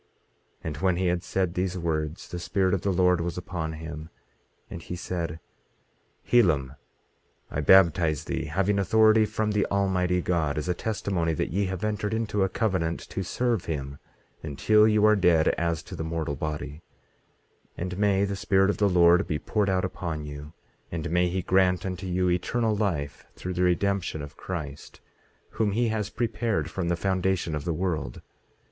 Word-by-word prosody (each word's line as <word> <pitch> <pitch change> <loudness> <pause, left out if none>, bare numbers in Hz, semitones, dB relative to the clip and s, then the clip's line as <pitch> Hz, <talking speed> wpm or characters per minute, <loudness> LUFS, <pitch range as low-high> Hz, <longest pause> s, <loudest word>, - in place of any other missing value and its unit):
18:13 - - -40 0.6
And 75 -2 -4
when 90 +3 +1
he 95 +1 -1
had 85 0 -1
said 95 -3 -1
these 90 0 -1
words, 80 -2 -2
the 90 - -6
Spirit 95 +1 0
of 95 - 0
the 100 - -1
Lord 90 -1 +3
was 85 +1 -3
upon 85 -3 -4
him, 80 0 -7 0.6
and 85 - -8
he 90 - -6
said: 85 -3 -4 0.9
Helam, 75 - +3 0.8
I 80 - -1
baptize 80 -3 +4
thee, - - -3
having 95 +6 0
authority 110 +2 +5
from 110 0 -1
the 105 -1 +2
Almighty 95 -2 +1
God, 80 -4 0
as 75 - -2
a 90 - +2
testimony 95 -4 -1
that - - -2
ye 100 +4 +1
have 95 0 -4
entered 105 0 -1
into 110 -2 -1
a 95 - +2
covenant 90 -6 -1
to - - -3
serve 120 +1 -1
him 70 -3 -4 0.4
until 105 +9 +3
you 105 -1 +4
are 105 0 +6
dead 90 -5 +4
as 85 -2 -1
to - - -9
the - - -4
mortal 80 -3 -3
body; 75 +1 -5 1.0
and 90 +1 -4
may 100 -1 +3
the 100 0 -3
Spirit 100 -1 +2
of - - -5
the 105 -1 +3
Lord 90 +1 +5
be 75 - -1
poured 105 +4 0
out 95 -1 +1
upon 80 -4 -4
you; 75 +1 -8 0.4
and 80 -1 -4
may 90 +1 +3
he 95 +1 -2
grant 90 -1 +2
unto 95 0 -4
you 90 0 0
eternal 105 +6 +1
life, 85 -9 -2
through 90 - -5
the 90 - -2
redemption 90 -3 0
of 70 +1 -10
Christ, 75 -6 -7 0.5
whom 105 -3 0
he 120 +2 +1
has 110 -2 -2
prepared 110 -9 -1
from 95 -3 -3
the 85 - +2
foundation 95 -2 0
of 75 -1 -3
the 85 - 0
world. 80 -8 -3
90 Hz, 180 wpm, -26 LUFS, 80-100 Hz, 1.0 s, are